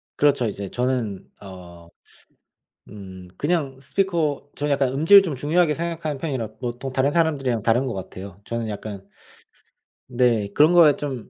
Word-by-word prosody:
그렇죠, 140 -4 +2
이제 100 -2 -5
저는 125 -5 -2 0.2
어. 90 -3 -12 1.0
음, 95 -3 -11
그냥 145 -4 -1
스피커 155 -3 -1
저는 145 0 -2
약간 135 -2 +2
음질을 165 +8 +7
좀 170 -6 -3
중요하게 150 +4 +1
생각하는 160 -3 -4
편이라 130 -7 -3
보통 125 +2 -5
다른 130 +1 +2
사람들이랑 140 -9 0
다른 120 +4 +2
것 125 - -3
같아요. 95 0 -9
저는 115 -1 -4
약간 105 -1 -6 1.1
네, 120 -4 +2
그런 155 +7 +5
거에 160 -5 +6
좀 135 -6 -6
130 Hz, 310 characters per minute, -23 LUFS, 110-150 Hz, 1.1 s, 음질을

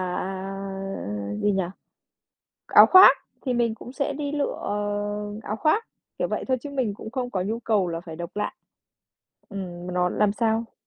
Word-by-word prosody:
à, 195 +1 -4 0.7
gì 205 - +3
nhỉ, 190 -1 +1 1.0
áo - - +8
khoác 375 +1 +9 0.3
thì 255 - +1
mình 235 -2 +1
cũng 245 +3 -10
sẽ 280 +1 -1
đi 285 0 -3
lựa, 290 -1 -1
ờ, 205 +1 -3
áo 215 - -3
khoác, 360 - +2 0.3
kiểu, - - 0
vậy - - -2
thôi 260 - +2
chứ 290 - -6
mình 255 -7 -1
cũng 220 - -8
không 250 0 -3
có 185 -5 -1
nhu 220 +4 -2
cầu 210 -6 +1
là 165 -1 -3
phải 165 -2 -9
độc 170 +1 -6
lạ. 210 - -1 1.0
Ừm, 180 -3 -6
mà 180 - -4
nó 180 0 +2
làm 210 +1 +2
sao 225 0 0
210 Hz, 180 wpm, -25 LUFS, 195-250 Hz, 1.0 s, khoác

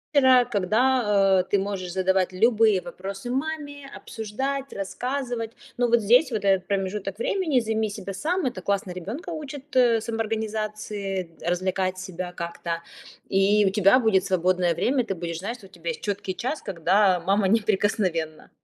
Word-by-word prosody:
-ра, 260 -3 +6
когда, 210 -2 +3
э, - - 0
ты - - +3
можешь 190 -2 -3
задавать 190 0 +1
любые 220 -1 +4
вопросы 195 +5 -7
маме, 285 +1 -4
обсуждать, 265 +5 -4
рассказывать, 245 +3 -3 0.3
но 245 0 +2
вот 235 0 +3
здесь 245 +8 +4
вот, 220 -3 -2
этот 190 -2 +2
промежуток 195 +1 -2
времени 315 -1 +1
займи 220 -1 -1
себя 200 -1 -6
сам, 335 - -1
это 215 -7 -4
классно 200 -1 -1
ребёнка 205 - -6
учит, 295 -3 -8
э, 240 -3 +4
самоорганизации, 215 -4 -3
развлекать 185 +2 -1
себя 185 -1 -6
как-то, 170 0 -5 0.6
и 200 +2 +4
у - - +4
тебя 200 +4 +5
будет 215 -6 +2
свободное 180 -1 +2
время, 255 - +1
ты 205 -4 -3
будешь 170 -1 -4
знать, 225 +7 -4
что 205 -6 -15
у - - -25
тебя 170 -3 -6
есть 160 - -8
чёткий 200 -2 -2
час, 255 +10 -3
когда 185 +1 +2
мама 195 +3 +1
неприкосновенна. 190 -6 0
205 Hz, 155 wpm, -25 LUFS, 185-240 Hz, 0.6 s, ра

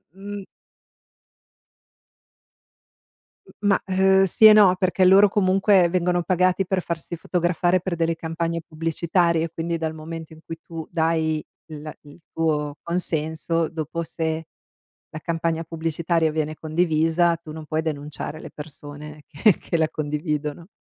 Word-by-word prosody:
M 200 0 -7 3.0
M - - -17 0.2
ma, 195 - +3
uhm, 190 0 +4
sì 195 +4 +4
e 215 - +11
no, 200 -4 +7
perché 185 0 +1
loro 195 +2 +7
comunque 190 -2 +3
vengono 175 0 +1
pagati 185 +1 +2
per 185 0 0
farsi 170 0 -5
fotografare 175 +1 +1
per 185 -2 -3
delle 165 0 0
campagne 165 0 -3
pubblicitarie, 165 +1 0
quindi 165 +1 -3
dal 160 -1 -3
momento 160 +1 -8
in 155 - -14
cui 165 - -6
tu 165 -2 -7
dai 160 -2 0 0.2
l 155 -1 -8
il 145 +3 -16
tuo 150 -2 -1
consenso, 165 -1 -1
dopo 165 +1 -4
se 160 0 -3 0.6
la 155 - -7
campagna 165 0 -2
pubblicitaria 165 0 0
viene 155 0 -2
condivisa, 165 +1 +1
tu 160 -2 -11
non 155 0 -8
puoi 155 +1 -1
denunciare 150 0 -5
le - - -9
persone 150 0 -9
che-che 170 +1 +2
la 160 -1 +1
condividono. 150 +1 -3
165 Hz, 135 wpm, -23 LUFS, 155-175 Hz, 3.0 s, e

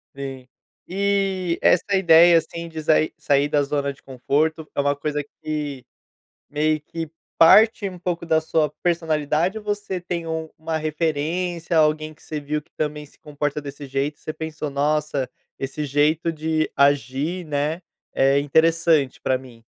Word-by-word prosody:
Sim. 135 -2 -7 0.4
E 195 -2 0
essa 190 +3 +3
ideia, 170 -2 +7
assim, 170 +1 -2
de 160 -1 -6
sair 155 0 +2
sair 140 0 +2
da 145 -1 +2
zona 140 0 -1
de - - -25
conforto 150 +5 -1
é - - 0
uma 140 0 +2
coisa 145 0 -3 0.2
que 145 -4 -4 0.6
meio 155 +1 +1
que 160 +1 -6 0.3
parte, 210 +4 +6
um 180 -2 -10
pouco, 175 -1 -3
da 160 -1 +3
sua 155 -1 +1
personalidade 165 +2 0
ou 215 - -13
você 205 -3 -3
tem 175 -1 -4
um 160 0 -3
uma 160 0 -3
referência, 160 +2 -1
ou 155 - +6
alguém 155 0 -3
que - - -24
você 155 - -5
viu 150 +1 -3
que - - -35
também 150 -1 -3
se 145 - -20
comporta 145 0 -3
desse 140 0 -8
jeito, 140 +2 -2
você 155 - -5
pensou: 155 -1 -5
"Nossa, 145 -1 0 0.3
esse 135 +3 -4
jeito 150 +4 +2
de 155 0 -1
agir, 145 +5 +1
né, 150 +3 -2 0.3
é 135 +1 +4
interessante 160 -1 +2
pra 130 - +1
mim"? 125 -3 -13
155 Hz, 160 wpm, -23 LUFS, 145-165 Hz, 0.6 s, ideia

